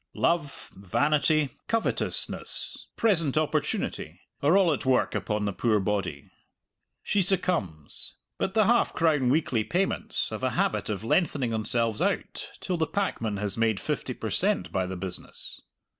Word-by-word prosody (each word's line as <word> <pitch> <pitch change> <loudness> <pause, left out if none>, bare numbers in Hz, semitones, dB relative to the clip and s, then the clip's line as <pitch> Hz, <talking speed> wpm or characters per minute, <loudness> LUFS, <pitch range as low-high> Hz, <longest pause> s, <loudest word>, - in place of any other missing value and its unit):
Love, 165 -5 0
vanity, 145 - +2 0.2
covetousness, 225 -1 -1
present 165 - +2
opportunity, 155 -1 -1 0.2
are 155 +7 +5
all 180 -5 +4
at 145 - -3
work 130 -2 +2
upon 105 -1 -1
the 100 - -1
poor 110 +1 +2
body. 95 -8 -2 0.7
She 205 - +1
succumbs. 140 - -1 0.2
But 190 - -1
the 215 -2 +5
half 235 +3 +3
crown 150 -6 +2
weekly 130 -6 +2
payments 185 - +1
have - - -5
a - - +2
habit - - 0
of 105 -1 -3
lengthening 135 -1 +1
themselves 110 0 0
out - - -1
till 180 -2 -1
the 160 -1 +1
packman 115 - -1
has 100 +1 -3
made 110 -3 +2
fifty - - -3
per - - -5
cent. - - +1
by 95 -1 0
the 95 - -4
business. 90 0 -7
130 Hz, 145 wpm, -27 LUFS, 105-170 Hz, 0.7 s, are